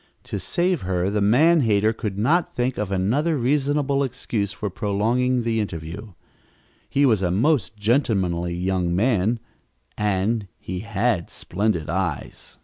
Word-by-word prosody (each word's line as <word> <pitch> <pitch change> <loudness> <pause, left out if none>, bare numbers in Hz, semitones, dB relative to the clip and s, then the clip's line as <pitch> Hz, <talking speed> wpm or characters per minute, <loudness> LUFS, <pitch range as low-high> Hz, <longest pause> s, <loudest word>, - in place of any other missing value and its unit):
To - - -5
save 175 -2 0
her, 90 +1 -1
the 105 0 0
man 150 +11 +5
hater 110 -2 +2
could 105 -3 -4
not 155 - +2
think 125 +1 -1
of 105 -2 -2
another 125 - +1
reasonable 140 +2 +1
excuse 115 -5 -2
for 105 -1 -4
prolonging 115 +6 0
the 115 -1 0
interview. 95 +1 -5 0.8
He 140 +1 +3
was 110 -7 +3
a 90 - +1
most 115 - +1
gentlemanly 95 -7 +1
young 90 -1 0
man, 110 +1 +2 0.6
and 105 +1 0
he 90 0 -5
had 110 -3 -1
splendid 90 -4 -2
eyes! 85 -6 -4
105 Hz, 140 wpm, -23 LUFS, 95-125 Hz, 0.8 s, man